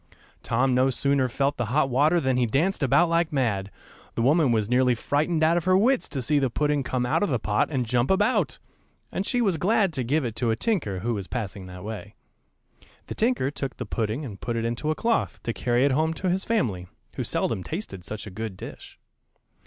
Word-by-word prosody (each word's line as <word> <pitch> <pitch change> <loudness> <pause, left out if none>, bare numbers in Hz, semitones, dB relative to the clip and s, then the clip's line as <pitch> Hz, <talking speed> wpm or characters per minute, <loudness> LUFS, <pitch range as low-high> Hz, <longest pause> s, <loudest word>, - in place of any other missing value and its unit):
Tom 125 +3 +1
no 130 +1 +3
sooner 135 0 +1
felt 140 +3 0
the 120 - -1
hot 135 +5 +2
water 145 +7 +3
than 130 -4 +1
he 125 -1 +2
danced 160 - +1
about 160 +6 +4
like 165 0 +1
mad; 110 -9 0 0.5
the 115 - 0
woman 145 0 +4
was 110 -3 +1
nearly 125 +1 +3
frightened 155 +7 0
out 165 +2 +4
of 170 - -2
her 185 0 +5
wits 250 +6 +2
to 135 -3 -3
see 150 +3 +2
the 135 -2 +1
pudding 145 +3 0
come 130 -2 -1
out 125 - +1
of 205 - +1
the 130 - +1
pot 105 -1 +1
and 130 -5 -1
jump 120 +2 +1
about, 205 +5 +2 0.5
and 195 - -2
she 245 - +1
was 195 -7 +2
glad 195 +1 +2
to 130 -3 -1
give 140 +4 0
it 115 -2 -4
to 115 0 0
a 110 - +2
tinker 115 - -1
who 120 +2 -1
was 100 -4 -4
passing 100 -5 -5
that 90 0 -9
way. 105 -1 -7 0.9
The - - -6
tinker 220 - +1
took 135 -2 -5
the - - -4
pudding 115 +5 -2
and 100 -6 -9
put 120 - -2
it 115 0 -1
into 120 +6 -2
a 155 - +1
cloth, 230 +4 0
to 115 - -2
carry 120 +3 +1
it 140 - +3
home 160 +4 +1
to 185 +1 -1
his 190 +2 -1
family, 110 - -1 0.3
who - - -3
seldom 95 - -1
tasted 155 - -6
such 105 +3 -6
a 105 - -8
good 110 -1 -5
dish. - - -10
130 Hz, 225 wpm, -25 LUFS, 115-160 Hz, 0.9 s, her